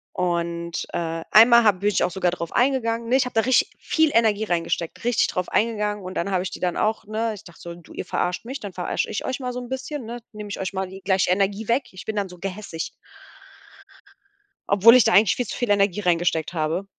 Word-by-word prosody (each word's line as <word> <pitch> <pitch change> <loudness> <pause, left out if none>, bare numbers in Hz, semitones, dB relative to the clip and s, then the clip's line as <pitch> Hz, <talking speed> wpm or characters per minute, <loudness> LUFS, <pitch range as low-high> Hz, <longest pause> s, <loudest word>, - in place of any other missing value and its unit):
Und, 170 -1 -2
äh, 165 -1 -3
einmal 235 +2 +8
ha 215 - +6
bin 200 +2 -1
ich 205 - +1
auch 180 - 0
sogar 180 0 0
drauf 170 -2 -5
eingegangen, 235 -3 +1
ne? 255 - +3
Ich 265 - +3
habe 250 - -6
da 225 - +3
richtig 255 +3 +3
viel 315 -2 +2
Energie 220 -2 +3
reingesteckt, 170 -3 -2
richtig 240 -1 +2
drauf 180 0 -3
eingegangen 210 -2 0
und 185 +1 -7
dann 195 +3 -2
habe 185 -1 +1
ich 190 - -3
die - - -8
dann 180 -2 -1
auch, 215 +1 0
ne 220 +2 -2
ich 200 - -13
dachte 170 - -15
so: 170 0 -8
„Du 170 - -15
ihr - - -5
verarscht 180 0 -2
mich, 265 +4 -6
dann 200 -3 -8
verarscht 180 - -2
ich - - -4
euch 260 0 -3
mal 250 -2 -4
so 250 - -4
'n 245 -1 -9
bisschen, 265 0 -5
ne? 235 +2 -6
Nehme 210 -1 -8
ich 200 - -5
euch 190 0 -3
mal 190 0 -2
die 190 +1 -11
gleiche 190 -1 +1
Energie 200 +3 0
weg.“ 245 +3 0
Ich 180 -1 -10
bin 220 - -4
dann 200 -2 -1
so 180 -1 -13
gehässig 190 -3 -5 1.8
obwohl 205 +4 +7
ich 255 - +7
da - - +2
eigentlich 200 +1 +5
viel 250 - -2
zu - - -5
viel 245 - -2
Energie 200 -1 +2
reingesteckt 170 -3 0
habe. 165 +3 -1
200 Hz, 240 wpm, -23 LUFS, 180-230 Hz, 1.8 s, einmal